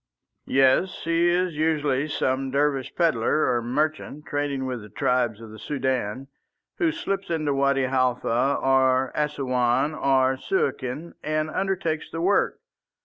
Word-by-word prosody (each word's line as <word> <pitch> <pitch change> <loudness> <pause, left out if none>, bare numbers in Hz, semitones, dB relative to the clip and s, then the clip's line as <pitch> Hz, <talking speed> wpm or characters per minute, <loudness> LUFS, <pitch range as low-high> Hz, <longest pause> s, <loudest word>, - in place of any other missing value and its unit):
"Yes. 135 +7 +3
He 165 +1 +2
is 180 0 +1
usually 150 -3 +1
some 135 -2 -1
Dervish 140 -1 0
pedlar 155 -3 +2
or 120 - 0
merchant 150 +4 -2
trading 145 -2 -2
with 125 -3 -4
the 105 - -12
tribes 120 0 0
of 115 -1 -11
the 110 - -11
Soudan, 130 -3 -2 0.5
who 330 -4 +2
slips 195 - -3
into 155 -4 0
Wadi 140 0 +2
Halfa 130 0 +1
or 130 -1 +2
Assouan 135 -2 0
or 130 -2 +2
Suakin 150 - -2
and 155 0 -1
undertakes 185 -5 -2
the 165 - -5
work. 195 +4 +1
140 Hz, 135 wpm, -25 LUFS, 130-155 Hz, 0.5 s, Yes